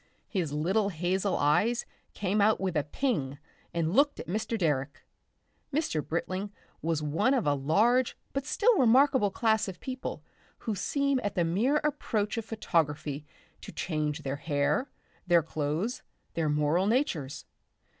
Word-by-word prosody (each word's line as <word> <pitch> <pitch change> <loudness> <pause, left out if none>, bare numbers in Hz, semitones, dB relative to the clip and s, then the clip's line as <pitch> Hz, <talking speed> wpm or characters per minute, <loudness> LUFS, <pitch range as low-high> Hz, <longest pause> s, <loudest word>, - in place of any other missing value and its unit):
His 175 -8 -2
little 190 +8 +1
hazel 185 +2 0
eyes 210 +12 +2 0.3
came 200 +1 0
out 215 +2 +4
with 185 -3 -2
a 150 - +2
"ping" 145 - -1 0.3
and 170 0 -1
looked 285 0 +3
at - - -5
Mr. 220 +4 -2
Direck. 145 -5 -1 0.7
Mr. 275 - 0
Britling 185 +4 -3 0.3
was 160 -2 -1
one 165 - +2
of 245 - 0
a 145 - +3
large 215 - +2 0.2
but 275 +1 -2
still 460 +8 +3
remarkable 260 -2 +5
class 220 +1 +1
of 185 -2 -7
people 260 0 -5 0.3
who 220 - -3
seem 280 +7 0
at 205 - -2
the 175 - +2
mere 220 - +2
approach 230 -8 -1
of 225 - -6
photography 150 -8 -1 0.3
to - - -8
change 155 -2 -2
their 135 0 -2
hair, 145 - 0 0.4
their 170 -2 +5
clothes, 155 +9 -2 0.3
their 160 -2 0
moral 150 +5 +2
natures. 190 - 0
185 Hz, 145 wpm, -29 LUFS, 150-230 Hz, 0.7 s, remarkable